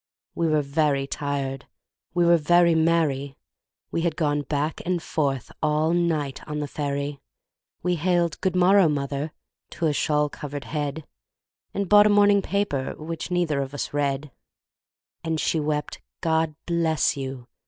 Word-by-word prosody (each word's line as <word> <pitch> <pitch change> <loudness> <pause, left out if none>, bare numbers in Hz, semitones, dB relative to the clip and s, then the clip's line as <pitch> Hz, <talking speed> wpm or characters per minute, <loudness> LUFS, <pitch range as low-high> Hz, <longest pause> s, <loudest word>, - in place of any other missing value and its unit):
We 170 - 0
were 155 -2 +2
very 140 -1 +1
tired, 140 -1 -3 0.5
we 175 -1 +3
were 170 0 +6
very 170 +2 +4
merry, 160 -4 +1 0.5
We 165 - -1
had 165 -2 0
gone 145 -3 +1
back 145 +2 -2
and 180 0 0
forth 140 -5 -2
all 155 +1 +2
night 160 -6 0
on 150 - -4
the 150 -1 -2
ferry, 140 0 -3 0.6
We 180 -1 +1
hailed 170 -1 +1
"Good 185 -1 0
morrow, 185 -1 +5
mother!" 140 +1 -2 0.5
to 170 - 0
a 155 - +2
shawl 150 0 +1
covered 145 -1 -7
head, 150 0 -3 0.7
And 200 -1 -2
bought 205 +1 +7
a - - +3
morning 205 -1 +5
paper, 190 -10 -1
which 160 +2 -6
neither 170 -5 +1
of 135 +1 -5
us 145 - -4
read; 145 0 -1 0.9
And 160 -1 -1
she 160 - +1
wept, 150 -1 -2 0.2
"God 160 -1 +1
bless 165 -2 +1
you!" 130 -3 -6
155 Hz, 155 wpm, -25 LUFS, 145-170 Hz, 0.9 s, bought